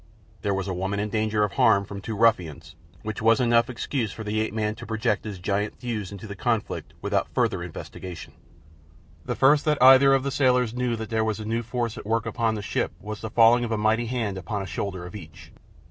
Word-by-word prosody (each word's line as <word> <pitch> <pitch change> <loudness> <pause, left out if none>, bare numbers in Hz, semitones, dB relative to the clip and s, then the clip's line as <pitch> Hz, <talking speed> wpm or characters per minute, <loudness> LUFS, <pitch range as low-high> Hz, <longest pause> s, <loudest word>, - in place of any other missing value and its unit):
There 100 -2 0
was 95 0 -3
a 95 - -2
woman 95 +3 -2
in 105 +1 -2
danger 110 0 0
of 105 - 0
harm 100 0 +3
from 100 0 -8
two 110 +1 -5
ruffians, 90 -10 +1 0.3
which 110 0 -5
was 115 +2 +4
enough 120 -1 +3
excuse 120 -3 -2
for 110 - -7
the 105 +1 -1
ape 110 - -2
man 105 -1 -1
to - - -8
project 110 -1 -1
his 105 -3 -5
giant 100 +3 -2
thews 110 -6 -4
into 100 +2 -8
the 100 -2 -7
conflict 115 +1 -2
without - - 0
further - - +1
investigation. 90 -3 -8 0.9
The - - -2
first 145 +2 +4
that 150 -1 +2
either 135 +1 +8
of 135 - 0
the 140 - -2
sailors 125 -4 +2
knew 125 -1 -1
that 110 0 -7
there 110 -1 +1
was 110 -1 -1
a 110 - -6
new 115 +2 -1
force 120 0 -3
at - - -10
work 115 0 0
upon 115 0 0
the 105 - -5
ship 100 - -2
was 105 0 -7
the 110 - -4
falling 115 +2 +5
of 115 - -3
a 110 - +1
mighty 110 +2 +1
hand 110 -6 -2
upon 100 +3 -4
a - - -6
shoulder 95 0 -4
of 90 - -9
each. 80 -7 -11
110 Hz, 230 wpm, -25 LUFS, 100-120 Hz, 0.9 s, either